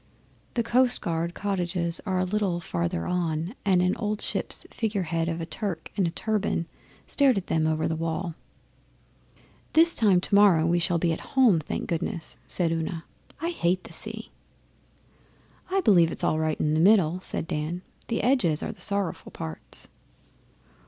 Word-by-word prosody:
The 235 Hz, -, +1 dB
Coastguard 180 Hz, -9 st, +1 dB
cottages 180 Hz, -3 st, -2 dB
are 190 Hz, -1 st, 0 dB
a 185 Hz, -, +2 dB
little 190 Hz, -2 st, -1 dB
farther 85 Hz, -, -2 dB
on, 170 Hz, 0 st, -1 dB
and 185 Hz, -3 st, +3 dB
an 180 Hz, -, +1 dB
old 210 Hz, -1 st, -2 dB
ship's -, -, -1 dB
figurehead 175 Hz, -7 st, -1 dB
of 165 Hz, 0 st, -3 dB
a 165 Hz, -, -3 dB
Turk 170 Hz, -1 st, -4 dB
in 190 Hz, -4 st, +1 dB
a -, -, 0 dB
turban 210 Hz, -1 st, -1 dB, 0.4 s
stared 275 Hz, -5 st, +3 dB
at 190 Hz, -, -2 dB
them 160 Hz, -1 st, +1 dB
over 155 Hz, 0 st, 0 dB
the 160 Hz, -, -1 dB
wall. 165 Hz, +1 st, -3 dB, 1.4 s
'This 330 Hz, +1 st, +6 dB
time 200 Hz, -5 st, +5 dB
tomorrow 195 Hz, -4 st, +4 dB
we 170 Hz, +1 st, +2 dB
shall 175 Hz, 0 st, +1 dB
be 170 Hz, 0 st, +1 dB
at -, -, -5 dB, 0.2 s
home, 235 Hz, -10 st, +6 dB
thank 155 Hz, -, -4 dB
goodness,' 165 Hz, 0 st, -4 dB
said 170 Hz, -3 st, +1 dB
Una. 165 Hz, 0 st, -3 dB, 0.4 s
'I 335 Hz, -, -1 dB
hate 180 Hz, -, 0 dB
the -, -, -11 dB
sea!' -, -, +2 dB, 1.4 s
'I 385 Hz, +1 st, +1 dB
believe 175 Hz, -, +5 dB
it's -, -, -7 dB
all 155 Hz, -, +1 dB
right 155 Hz, -1 st, -1 dB
in 150 Hz, -, +1 dB
the 155 Hz, -, +2 dB
middle,' 180 Hz, -2 st, +4 dB
said 185 Hz, -, -2 dB
Dan. 160 Hz, +4 st, -3 dB, 0.2 s
'The 230 Hz, -, -1 dB
edges 225 Hz, -, +2 dB
are -, -, -3 dB
the 220 Hz, -, -11 dB
sorrowful 200 Hz, -4 st, -1 dB
parts. 80 Hz, -1 st, -6 dB
175 Hz, 165 wpm, -26 LUFS, 165-205 Hz, 1.4 s, This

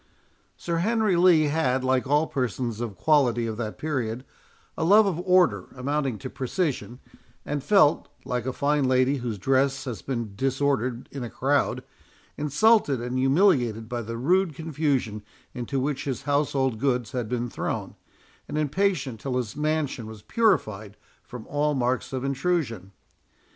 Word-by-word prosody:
Sir 170 Hz, -1 st, -2 dB
Henry 215 Hz, +1 st, +2 dB
Lee 170 Hz, -2 st, +5 dB
had, 145 Hz, -4 st, +1 dB
like 130 Hz, 0 st, +1 dB
all 150 Hz, +3 st, +3 dB
persons 120 Hz, -4 st, -3 dB
of 110 Hz, -6 st, -5 dB
quality 125 Hz, -, +3 dB
of 110 Hz, -1 st, -3 dB
that 110 Hz, -2 st, -4 dB
period, 130 Hz, -5 st, -3 dB, 0.5 s
a -, -, -2 dB
love 205 Hz, +6 st, +6 dB
of 180 Hz, -4 st, -1 dB
order 180 Hz, -1 st, +3 dB
amounting 135 Hz, -2 st, -1 dB
to 130 Hz, -, -7 dB
precision, 130 Hz, -1 st, -3 dB, 0.5 s
and 145 Hz, -2 st, -3 dB
felt, 185 Hz, -7 st, +4 dB, 0.2 s
like 125 Hz, 0 st, -2 dB
a -, -, 0 dB
fine 145 Hz, +1 st, +1 dB
lady 130 Hz, +2 st, +2 dB
whose 120 Hz, -4 st, -4 dB
dress 135 Hz, +6 st, +1 dB
has 125 Hz, -5 st, -5 dB
been 120 Hz, -6 st, -4 dB
disordered 130 Hz, -1 st, -1 dB
in 135 Hz, -3 st, -5 dB
a 120 Hz, -, -5 dB
crowd, 140 Hz, +4 st, 0 dB, 0.5 s
insulted 150 Hz, -, +3 dB
and 125 Hz, +2 st, -3 dB
humiliated 130 Hz, -, +2 dB
by 120 Hz, 0 st, -3 dB
the 115 Hz, +1 st, -5 dB
rude 175 Hz, +5 st, +2 dB
confusion 140 Hz, -9 st, -1 dB, 0.3 s
into 125 Hz, +2 st, -3 dB
which 135 Hz, +1 st, -2 dB
his 135 Hz, -4 st, -3 dB
household 140 Hz, -4 st, 0 dB
goods 125 Hz, -4 st, 0 dB
had 120 Hz, -4 st, -3 dB
been 120 Hz, 0 st, -1 dB
thrown, -, -, -4 dB, 0.5 s
and -, -, -4 dB
impatient 155 Hz, -, 0 dB
till 130 Hz, +1 st, -2 dB
his 120 Hz, -5 st, -3 dB
mansion 150 Hz, -6 st, -1 dB
was 110 Hz, -1 st, -10 dB
purified 110 Hz, -, 0 dB, 0.2 s
from 125 Hz, -3 st, -10 dB
all 145 Hz, +1 st, 0 dB
marks 125 Hz, 0 st, -1 dB
of 130 Hz, -1 st, -3 dB
intrusion. 135 Hz, -, -1 dB
135 Hz, 155 wpm, -25 LUFS, 120-150 Hz, 0.5 s, love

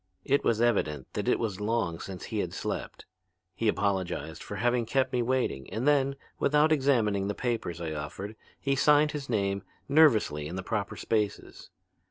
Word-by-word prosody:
It 140 Hz, +1 st, +2 dB
was 115 Hz, -2 st, +2 dB
evident 80 Hz, -, 0 dB
that -, -, -3 dB
it -, -, +3 dB
was 105 Hz, -4 st, -3 dB
long 105 Hz, -6 st, 0 dB
since 95 Hz, -2 st, -7 dB
he -, -, -3 dB
had -, -, -2 dB
slept. -, -, -4 dB, 0.5 s
He 110 Hz, +4 st, -1 dB
apologized 100 Hz, -3 st, -1 dB
for -, -, -6 dB
having 120 Hz, -1 st, +1 dB
kept 135 Hz, +2 st, +1 dB
me 125 Hz, -, +2 dB
waiting 120 Hz, -, -1 dB
and 120 Hz, +5 st, -2 dB
then, 140 Hz, -2 st, +3 dB, 0.2 s
without 150 Hz, +2 st, +3 dB
examining 115 Hz, -9 st, +2 dB
the 100 Hz, -, -2 dB
papers 115 Hz, -9 st, -2 dB
I 80 Hz, -2 st, -3 dB
offered, 85 Hz, +8 st, -6 dB, 0.2 s
he 140 Hz, 0 st, 0 dB
signed 150 Hz, +2 st, +4 dB
his 145 Hz, -3 st, -6 dB
name 100 Hz, -3 st, 0 dB, 0.3 s
nervously 115 Hz, -, +4 dB
in 85 Hz, -, -6 dB
the 95 Hz, -, -4 dB
proper 105 Hz, 0 st, -2 dB
spaces. 105 Hz, -2 st, -2 dB
110 Hz, 175 wpm, -29 LUFS, 95-135 Hz, 0.5 s, signed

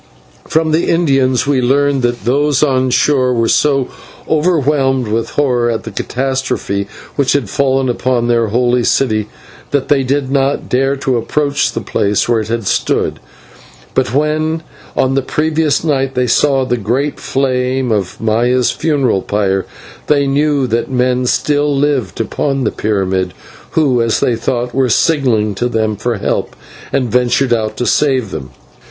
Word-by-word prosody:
From 160 Hz, 0 st, +1 dB
the 160 Hz, +2 st, +1 dB
Indians 135 Hz, -7 st, +2 dB
we 140 Hz, -2 st, +1 dB
learned 140 Hz, +2 st, +2 dB
that 120 Hz, -1 st, -2 dB
those 140 Hz, +3 st, +2 dB
on 130 Hz, -3 st, +2 dB
shore 130 Hz, 0 st, +2 dB
were 115 Hz, -1 st, +1 dB
so 135 Hz, -1 st, +2 dB, 0.4 s
overwhelmed 145 Hz, -6 st, +1 dB
with 110 Hz, +2 st, -1 dB
horror 125 Hz, -5 st, +1 dB
at 115 Hz, -1 st, -2 dB
the 110 Hz, -, -7 dB
catastrophe 130 Hz, -4 st, -2 dB, 0.3 s
which 140 Hz, -2 st, +2 dB
had 130 Hz, -8 st, -1 dB
fallen 135 Hz, -1 st, +1 dB
upon 120 Hz, -1 st, 0 dB
their 115 Hz, -1 st, +2 dB
holy 120 Hz, +2 st, +1 dB
city, 110 Hz, -5 st, +1 dB, 0.4 s
that 140 Hz, -2 st, -1 dB
they 145 Hz, -2 st, +3 dB
did 135 Hz, 0 st, -1 dB
not 140 Hz, 0 st, 0 dB
dare 135 Hz, +2 st, +1 dB
to 135 Hz, -2 st, -1 dB
approach 140 Hz, +4 st, 0 dB
the -, -, -3 dB
place 100 Hz, 0 st, 0 dB
where 120 Hz, -1 st, +2 dB
it 110 Hz, -, -4 dB
had 115 Hz, -1 st, -2 dB
stood. -, -, 0 dB, 0.7 s
But -, -, 0 dB
when 155 Hz, +3 st, 0 dB, 0.3 s
on 130 Hz, 0 st, +1 dB
the 135 Hz, -, +1 dB
previous 155 Hz, +2 st, 0 dB
night 135 Hz, -4 st, 0 dB
they 125 Hz, 0 st, +1 dB
saw 135 Hz, +2 st, +2 dB
the 125 Hz, -1 st, -1 dB
great 125 Hz, +7 st, -1 dB
flame 130 Hz, -1 st, -1 dB
of 100 Hz, -4 st, -2 dB
Maya's 120 Hz, +3 st, +1 dB
funeral 135 Hz, -11 st, 0 dB
pyre, 95 Hz, -2 st, -1 dB, 0.4 s
they 145 Hz, -2 st, +3 dB
knew 140 Hz, 0 st, +1 dB
that 115 Hz, +1 st, -1 dB
men 125 Hz, 0 st, +1 dB
still 145 Hz, +1 st, +1 dB
lived 135 Hz, -8 st, 0 dB
upon 135 Hz, +4 st, -1 dB
the 110 Hz, -, 0 dB
pyramid, 95 Hz, -3 st, -1 dB, 0.4 s
who, 135 Hz, -6 st, +3 dB
as 115 Hz, -1 st, +1 dB
they 120 Hz, -, +1 dB
thought, 120 Hz, +1 st, -2 dB
were 130 Hz, -1 st, +1 dB
signalling 115 Hz, -6 st, +2 dB
to 120 Hz, +5 st, -2 dB
them 110 Hz, -2 st, 0 dB
for 115 Hz, +2 st, -2 dB
help, -, -, -2 dB, 0.4 s
and 130 Hz, -5 st, 0 dB
ventured 125 Hz, +2 st, +2 dB
out 110 Hz, -2 st, -2 dB
to 125 Hz, -, -1 dB
save 130 Hz, -8 st, +1 dB
them. 70 Hz, -6 st, -6 dB
130 Hz, 160 wpm, -15 LUFS, 115-140 Hz, 0.7 s, they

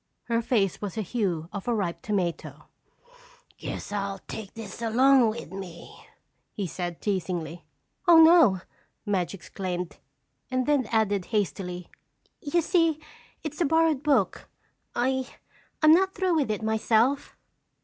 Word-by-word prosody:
Her 230 Hz, -1 st, 0 dB
face 210 Hz, -6 st, 0 dB
was 205 Hz, -1 st, -4 dB
the 220 Hz, -, -2 dB
hue 180 Hz, -6 st, -2 dB
of 200 Hz, +1 st, -6 dB
a 240 Hz, -, +2 dB
ripe 170 Hz, -5 st, -2 dB
tomato. 185 Hz, -5 st, -3 dB, 0.4 s
"I -, -, -25 dB, 0.4 s
guess -, -, -6 dB
I'll 200 Hz, -1 st, -2 dB
just -, -, -25 dB
take 210 Hz, -3 st, -7 dB
this 225 Hz, -1 st, -8 dB
along 250 Hz, +2 st, +5 dB
with 215 Hz, -6 st, -6 dB
me," 185 Hz, -3 st, -10 dB, 0.4 s
he 200 Hz, -, -4 dB
said 175 Hz, -1 st, -5 dB
teasingly. 175 Hz, -4 st, -3 dB, 0.4 s
"Oh, 340 Hz, -1 st, +8 dB
no!" 320 Hz, -, +7 dB, 0.4 s
Madge 195 Hz, -3 st, -1 dB
exclaimed 180 Hz, -1 st, -5 dB, 0.5 s
and 255 Hz, -1 st, 0 dB
then 285 Hz, -5 st, +2 dB
added 205 Hz, -4 st, +1 dB
hastily: 180 Hz, -3 st, -3 dB, 0.5 s
"You 320 Hz, +4 st, +1 dB
see, 330 Hz, -3 st, +2 dB, 0.4 s
it's 305 Hz, +1 st, -5 dB
a -, -, +4 dB
borrowed 320 Hz, -2 st, +3 dB
book. 275 Hz, -11 st, +1 dB, 0.5 s
I—I'm 260 Hz, +4 st, 0 dB
not 380 Hz, +3 st, +3 dB
through 370 Hz, -1 st, +1 dB
with 295 Hz, -7 st, +1 dB
it 215 Hz, 0 st, -2 dB
myself." 225 Hz, +5 st, +1 dB
220 Hz, 140 wpm, -27 LUFS, 190-275 Hz, 0.5 s, Oh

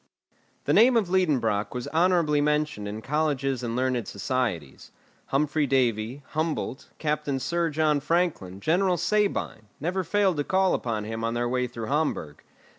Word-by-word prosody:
The -, -, +2 dB
name 240 Hz, +2 st, +6 dB
of 205 Hz, -6 st, +1 dB
Liedenbrock 125 Hz, -, +1 dB
was 125 Hz, -, -4 dB
honourably 165 Hz, -3 st, +3 dB
mentioned 150 Hz, -8 st, 0 dB
in 105 Hz, +2 st, -6 dB
colleges 135 Hz, -3 st, 0 dB
and 120 Hz, -1 st, -3 dB
learned 125 Hz, -3 st, 0 dB
societies. 100 Hz, -, -3 dB, 0.4 s
Humphry 145 Hz, +1 st, +1 dB
Davy, 125 Hz, 0 st, 0 dB
Humboldt, 155 Hz, -4 st, -3 dB
Captain 150 Hz, -3 st, -1 dB
Sir 170 Hz, +4 st, 0 dB
John 155 Hz, -1 st, +2 dB
Franklin, 150 Hz, -, -1 dB
General 180 Hz, -, +2 dB
Sabine, 185 Hz, -, 0 dB
never 180 Hz, +5 st, -1 dB
failed 190 Hz, -1 st, +1 dB
to 145 Hz, -, +1 dB
call 190 Hz, +3 st, +2 dB
upon 110 Hz, -3 st, -2 dB
him 115 Hz, +1 st, -5 dB
on 115 Hz, +1 st, -1 dB
their 120 Hz, 0 st, 0 dB
way 125 Hz, 0 st, 0 dB
through 115 Hz, -2 st, -6 dB
Hamburg. 140 Hz, -, -2 dB
145 Hz, 150 wpm, -26 LUFS, 120-165 Hz, 0.4 s, name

